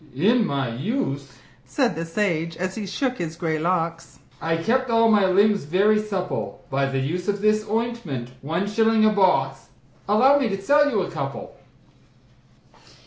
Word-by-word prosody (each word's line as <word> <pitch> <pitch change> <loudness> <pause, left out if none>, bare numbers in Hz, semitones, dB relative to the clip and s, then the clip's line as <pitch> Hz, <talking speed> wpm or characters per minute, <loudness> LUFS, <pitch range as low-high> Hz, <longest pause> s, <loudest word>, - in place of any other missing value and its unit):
"In 215 - +3
my 140 -2 -1
youth," 140 - -4 0.2
said 260 -5 0
the 165 - -4
sage, 165 -2 -2
as 185 +2 -3
he 210 -1 -5
shook 255 +6 -2
his 165 -2 -4
grey 160 -2 -2
locks, 165 0 -2 0.2
"I 165 0 0
kept 250 +9 0
all 230 -1 +4
my 205 -3 +4
limbs 200 0 +3
very 200 +7 +3
supple 185 - -4
By 135 0 +1
the 135 0 -2
use 165 +7 -2
of 205 0 0
this 215 0 +1
ointment 215 - -3
one 165 +7 -2
shilling 220 +1 +3
a 215 - +5
box 185 -10 +1 0.4
Allow 260 +7 +5
me 260 -5 0
to 195 -1 -3
sell 290 +8 +3
you 215 -7 0
a 180 - -6
couple?" 135 0 -6
190 Hz, 165 wpm, -23 LUFS, 160-215 Hz, 0.4 s, a